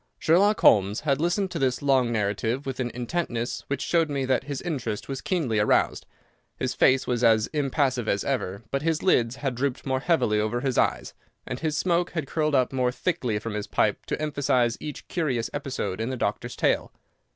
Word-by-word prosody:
Sherlock 200 +6 +3
Holmes 100 +1 +4
had 145 -2 0
listened 180 +3 0
to 165 - -3
this 130 0 0
long 130 -4 +3
narrative 110 +4 -1
with 135 -1 -4
an 125 -2 -1
intentness 120 -1 -3
which 140 - -2
showed 165 -2 +2
me 140 -2 -1
that 130 0 +1
his 140 -2 -4
interest 130 - -4
was 135 -1 -4
keenly 140 - 0
aroused. 105 - +2 0.5
His - - -2
face 130 0 +3
was 120 -1 -1
as 110 -2 +5
impassive 135 -4 0
as 100 - 0
ever, 115 -7 -2
but 140 - 0
his 160 0 0
lids 120 -10 +3
had 135 -2 -2
drooped 130 +1 -2
more 130 -1 0
heavily 135 -9 +2
over 110 +3 -1
his 130 -2 -1
eyes, - - 0 0.3
and 125 - -5
his 155 -2 -1
smoke 175 0 +1
had 160 -4 -2
curled 155 +1 0
up 130 0 +2
more 125 -1 +1
thickly 125 -7 -1
from 110 +1 -5
his 105 -1 -4
pipe - - 0
to - - -2
emphasize 130 -5 +1
each 150 -2 -7
curious 135 -10 -1
episode 105 -7 -3
in 115 - -2
the 130 - -3
doctor's 120 +3 -2
tale. - - +1
130 Hz, 195 wpm, -26 LUFS, 115-150 Hz, 0.5 s, as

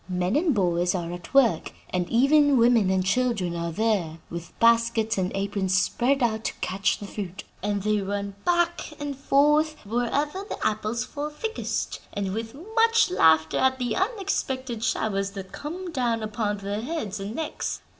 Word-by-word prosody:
Men 180 +4 0
and 310 -2 +2
boys 175 -2 +1
are 170 -2 -3
at 175 -1 -9
work, 240 -12 +3 0.2
and 180 -1 -1
even 285 +3 +4
women 230 -4 +4
and 190 -1 +1
children 200 -5 +1
are 170 0 -2
there 195 -5 0
with 170 -1 -8
baskets 230 -1 +3
and 185 0 0
aprons 195 -1 0
spread 255 +8 +1
out 220 -2 0
to - - -2
catch 195 0 0
the 205 - -8
fruit; 195 -2 -6 0.2
and 205 -1 -1
they 210 0 +1
run 200 0 -3
back 345 -3 0
and 290 -1 -4
forth 295 +3 +3
wherever 280 - -1
the - - -4
apples 215 +2 0
fall 290 +3 -5
thickest, 440 +10 -3 0.2
with 220 +4 -3 0.2
much 455 -3 +4
laughter 160 - +4
at 260 0 +3
the 245 -3 -1
unexpected 270 - -2
showers 195 -4 0
that 195 -2 -8
come 350 +4 -6
down 240 -6 0
upon 215 -1 -2
their 200 +1 -3
heads 225 - -4
and 200 +3 -5
necks. 320 - -3
225 Hz, 165 wpm, -25 LUFS, 195-280 Hz, 0.2 s, even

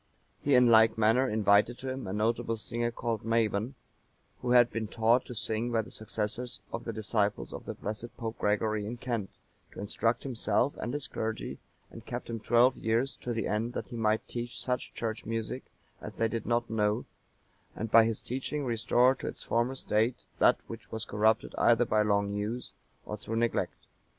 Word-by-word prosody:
He 140 -1 +3
in 125 0 +7
like 110 -1 +6
manner 115 +4 +4
invited 105 +2 +3
to 130 - -5
him 130 -3 -5
a - - -3
notable 115 +2 0
singer 120 +2 -1
called 115 -2 -2
Maban,(943) 115 +1 +1 0.7
who 125 - -4
had 120 -1 +6
been 115 -1 -2
taught 115 +3 +3
to 125 - -8
sing 115 +2 -1
by 115 -1 +2
the - - -13
successors 110 +3 -3
of - - -4
the 115 - -2
disciples 105 -1 -1
of - - -7
the - - -5
blessed 110 +3 -6
Pope 115 -1 -5
Gregory 105 0 +1
in 115 +4 -5
Kent, 115 -5 -3 0.4
to - - -9
instruct 115 +3 0
himself 120 0 +1
and 120 - -3
his 145 +1 -3
clergy, 110 0 -4 0.3
and - - -10
kept - - -5
him 115 - -3
twelve 120 +3 +4
years, 115 +5 0
to 125 - -5
the 115 -3 -1
end 110 +3 -1
that - - -5
he 120 - -7
might 110 -1 +1
teach 120 0 -5
such 125 -1 -2
Church 110 -1 -3
music 115 +3 -3 0.4
as - - -7
they 115 - +2
did 115 0 -4
not 120 0 +1
know, 105 -1 0 0.7
and 110 0 -4
by 115 0 +8
his 115 -1 -1
teaching 135 +3 -3
restore 120 +2 +3
to - - -7
its - - -6
former 120 +3 0
state 115 -1 +1 0.2
that - - +6
which - - -10
was 110 0 -4
corrupted 110 +1 +2
either 120 +1 +5
by 110 -1 +2
long 100 -1 +1
use, 105 +4 -3 0.3
or 105 - -4
through 110 +2 -5
neglect. 115 0 -1
115 Hz, 190 wpm, -30 LUFS, 110-120 Hz, 0.7 s, by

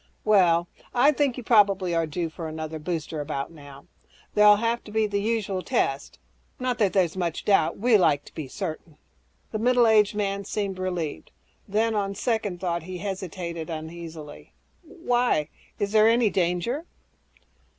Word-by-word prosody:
"Well, 175 -5 +4 0.3
I 265 +5 +5
think 280 -3 0
you 250 - -6
probably 200 -6 +3
are 165 -1 +1
due 165 +1 -3
for 165 0 -6
another 155 0 -5
booster 160 -1 -4
about 140 -1 -4
now. 145 -3 -13 0.5
There'll 210 0 +7
have 230 +2 -1
to 210 - -10
be 220 0 +2
the 200 -1 -1
usual 205 -4 -1
tests. 140 -4 -1 0.4
Not 250 -2 -1
that 205 -4 +3
there's 185 -4 +2
much 170 -3 -3
doubt... 195 -6 +3
we 235 +2 +3
like 145 -7 +2
to - - -15
be 155 -4 -6
certain." 160 0 -6 0.5
The 215 - -3
middle 245 +1 +4
aged 215 -2 +4
man 200 -1 -1
seemed 200 -2 -3
relieved. 180 -5 -3 0.4
Then, 220 +3 +1
on 200 -2 -1
second 215 -5 -1
thought, 170 -1 -2
he 180 +3 -7
hesitated 175 -3 -5
uneasily, 160 -1 -8 0.3
"Why? 245 - 0 0.3
Is 200 0 -2
there 215 0 +5
any 230 -2 +3
danger?" 185 - -1
190 Hz, 160 wpm, -25 LUFS, 165-215 Hz, 0.5 s, There'll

